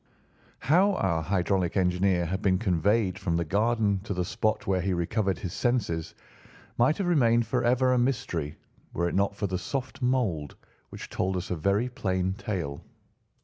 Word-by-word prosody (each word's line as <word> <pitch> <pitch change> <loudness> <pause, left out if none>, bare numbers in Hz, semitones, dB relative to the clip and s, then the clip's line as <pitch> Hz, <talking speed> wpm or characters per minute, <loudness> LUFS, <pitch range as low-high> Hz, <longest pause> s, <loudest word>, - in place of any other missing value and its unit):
How 180 +9 +3
our 85 - 0
hydraulic 90 +1 0
engineer 90 -1 +2
had 95 +4 -3
been 95 -2 +2
conveyed 95 0 +1
from 85 -3 -1
the 85 - -1
garden 105 +2 +1
to 100 - -3
the 90 0 -1
spot 110 +4 -1
where 95 -1 +1
he 95 +1 0
recovered 95 +3 0
his 90 - -5
senses 100 -10 -1 0.6
might 130 +6 +4
have 195 - -1
remained 120 -9 +3
forever 125 +2 +2
a 125 - +3
mystery 120 - -1 0.4
were 85 +1 0
it - - -3
not 100 +1 +1
for 100 - -2
the 95 -2 -2
soft 130 +8 -4
mould, 115 - 0 0.3
which - - -8
told 95 0 -1
us 90 0 -5
a - - +1
very 100 +8 +1
plain 95 -6 -1
tale. 90 -9 -4
100 Hz, 170 wpm, -27 LUFS, 90-120 Hz, 0.6 s, might